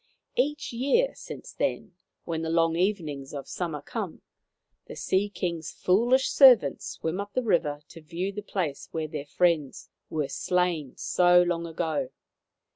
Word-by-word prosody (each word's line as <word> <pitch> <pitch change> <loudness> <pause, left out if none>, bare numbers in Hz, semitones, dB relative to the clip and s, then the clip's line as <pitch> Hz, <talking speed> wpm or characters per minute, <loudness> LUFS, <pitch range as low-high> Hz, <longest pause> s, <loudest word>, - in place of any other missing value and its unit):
Each 295 +1 0
year 280 - +2
since - - -9
then, - - -2 0.3
when 165 -1 -3
the 160 - -3
long 165 0 +2
evenings 155 -7 -2
of 140 - -6
summer 160 -5 -4
come, - - -5 0.6
the - - -8
Sea 195 +2 0
King's 170 -5 -3
foolish 240 +8 +2
servants 245 - +6
swim 160 +4 -3
up 200 0 -5
the 255 - 0
river 160 -9 +1
to 165 - -12
view 170 +5 -3
the 210 +1 -6
place 180 -8 -3
where 160 -1 -2
their 150 -1 -6
friends 165 -4 0 0.2
were 150 -3 -1
slain 165 -1 -1
so 180 0 +4
long 170 -1 -1
ago. 160 -5 -2
170 Hz, 150 wpm, -27 LUFS, 155-200 Hz, 0.6 s, servants